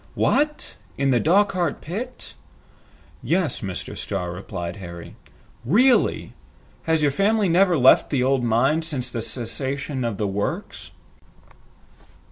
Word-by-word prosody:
"What! 300 Hz, 0 st, 0 dB, 0.2 s
In 140 Hz, 0 st, +1 dB
the 120 Hz, -, +3 dB
Dochart 185 Hz, -, +2 dB
pit?" 235 Hz, +10 st, -7 dB, 0.9 s
"Yes, 170 Hz, -6 st, -1 dB
Mr. 95 Hz, -3 st, -5 dB
Starr," 90 Hz, -1 st, -4 dB
replied 90 Hz, -1 st, -6 dB
Harry. 85 Hz, -3 st, -9 dB, 0.5 s
"Really! 235 Hz, -, +2 dB, 0.5 s
has 160 Hz, -1 st, +1 dB
your 145 Hz, -, +3 dB
family 205 Hz, +6 st, +2 dB
never 180 Hz, 0 st, +3 dB
left 130 Hz, -1 st, +5 dB
the 135 Hz, -4 st, +1 dB
old 130 Hz, -1 st, +1 dB
mine 125 Hz, +7 st, +2 dB
since 130 Hz, -6 st, -4 dB
the 115 Hz, -, -3 dB
cessation 130 Hz, +4 st, -4 dB
of 115 Hz, -4 st, -2 dB
the 105 Hz, -, -1 dB
works?" 100 Hz, +1 st, -4 dB
140 Hz, 120 wpm, -23 LUFS, 115-180 Hz, 0.9 s, left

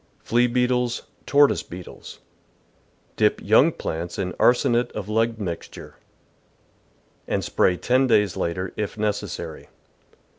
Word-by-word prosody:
Flea 120 Hz, +1 st, +2 dB
Beetles, 125 Hz, 0 st, 0 dB, 0.2 s
Tortoise 145 Hz, 0 st, +4 dB
Beetles. 90 Hz, 0 st, -11 dB, 0.5 s
— -, -, -38 dB
Dip -, -, +2 dB
young -, -, +4 dB
plants 85 Hz, +2 st, -5 dB
in 90 Hz, -2 st, -3 dB
arsenate 120 Hz, 0 st, +3 dB
of 105 Hz, -2 st, -5 dB
lead 115 Hz, +1 st, 0 dB
mixture, 90 Hz, -5 st, -7 dB, 1.3 s
and -, -, -1 dB
spray 90 Hz, -, +1 dB
ten 130 Hz, +5 st, +2 dB
days 105 Hz, -6 st, +2 dB
later, 90 Hz, +2 st, -3 dB
if 105 Hz, 0 st, -4 dB
necessary. 105 Hz, -1 st, -4 dB
110 Hz, 115 wpm, -23 LUFS, 95-125 Hz, 1.3 s, Tortoise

